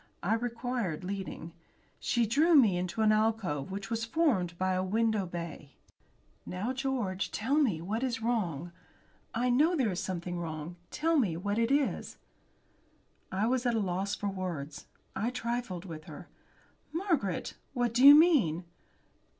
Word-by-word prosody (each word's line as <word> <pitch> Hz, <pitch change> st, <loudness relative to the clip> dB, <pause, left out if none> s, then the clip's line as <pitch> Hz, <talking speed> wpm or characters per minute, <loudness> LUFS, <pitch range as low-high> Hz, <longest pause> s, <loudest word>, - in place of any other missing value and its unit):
I 200 Hz, +5 st, +2 dB
required 235 Hz, -6 st, -2 dB
leading. 185 Hz, -3 st, -5 dB, 0.5 s
She 240 Hz, -1 st, +1 dB
drew 310 Hz, +10 st, +4 dB
me 225 Hz, -10 st, +6 dB
into 180 Hz, +4 st, -2 dB
an 215 Hz, -, +5 dB
alcove, 215 Hz, -10 st, 0 dB
which 195 Hz, +1 st, -6 dB
was 230 Hz, 0 st, -1 dB
formed 225 Hz, -, +1 dB
by 185 Hz, +1 st, +1 dB
a 185 Hz, 0 st, 0 dB
window 215 Hz, 0 st, +1 dB
bay. 170 Hz, -5 st, -7 dB, 0.7 s
"Now, 205 Hz, +8 st, -3 dB
George, 250 Hz, -8 st, -2 dB
tell 230 Hz, +6 st, -2 dB
me 215 Hz, -, +1 dB
what 215 Hz, +6 st, -2 dB
is 250 Hz, -3 st, -1 dB
wrong. 180 Hz, -, -1 dB, 0.6 s
I 245 Hz, +2 st, +1 dB
know 305 Hz, +8 st, +4 dB
there 255 Hz, -9 st, +1 dB
is 180 Hz, -, -3 dB
something 175 Hz, -1 st, -4 dB
wrong. 160 Hz, 0 st, -5 dB
Tell 325 Hz, 0 st, +1 dB
me 185 Hz, -10 st, +1 dB
what 205 Hz, +4 st, -1 dB
it 230 Hz, 0 st, +2 dB
is." 280 Hz, 0 st, 0 dB, 1.1 s
I 195 Hz, +3 st, 0 dB
was 250 Hz, +1 st, +1 dB
at 240 Hz, -, +1 dB
a -, -, +2 dB
loss 195 Hz, +1 st, -1 dB
for 205 Hz, -, -4 dB
words. 170 Hz, -7 st, -5 dB, 0.3 s
I 210 Hz, +5 st, 0 dB
trifled 235 Hz, -7 st, -3 dB
with 155 Hz, -4 st, -8 dB
her. -, -, -10 dB, 0.6 s
"Margaret! 320 Hz, -, -1 dB, 0.2 s
What 240 Hz, -2 st, 0 dB
do 245 Hz, +2 st, +2 dB
you 285 Hz, +1 st, +12 dB
mean?" 275 Hz, -, +4 dB
215 Hz, 155 wpm, -30 LUFS, 180-245 Hz, 1.1 s, you